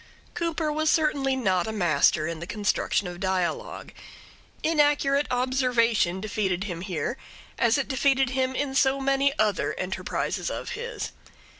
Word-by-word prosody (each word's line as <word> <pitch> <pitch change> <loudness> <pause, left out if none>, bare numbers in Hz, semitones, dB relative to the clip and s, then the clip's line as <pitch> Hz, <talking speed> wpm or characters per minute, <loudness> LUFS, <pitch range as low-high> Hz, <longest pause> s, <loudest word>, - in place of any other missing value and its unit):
Cooper 330 -2 -1
was 310 +1 +1
certainly 295 -5 +2
not 190 -8 +1
a - - -2
master 165 -5 +2
in 165 0 -4
the 170 - -7
construction 205 0 0
of 175 0 -7
dialogue. 185 -2 -2 0.7
Inaccurate 290 -2 +2
observation 245 -7 +1
defeated 195 -3 -1
him 175 -5 -5
here 180 - -3 0.4
as 235 +2 +3
it 275 - -1
defeated 270 -1 +2
him 260 0 0
in 275 -1 -1
so 270 0 +3
many 275 +1 +2
other 210 -3 +1
enterprises 185 +1 -3
of - - -5
his. 475 +2 -5
250 Hz, 140 wpm, -26 LUFS, 190-275 Hz, 0.7 s, as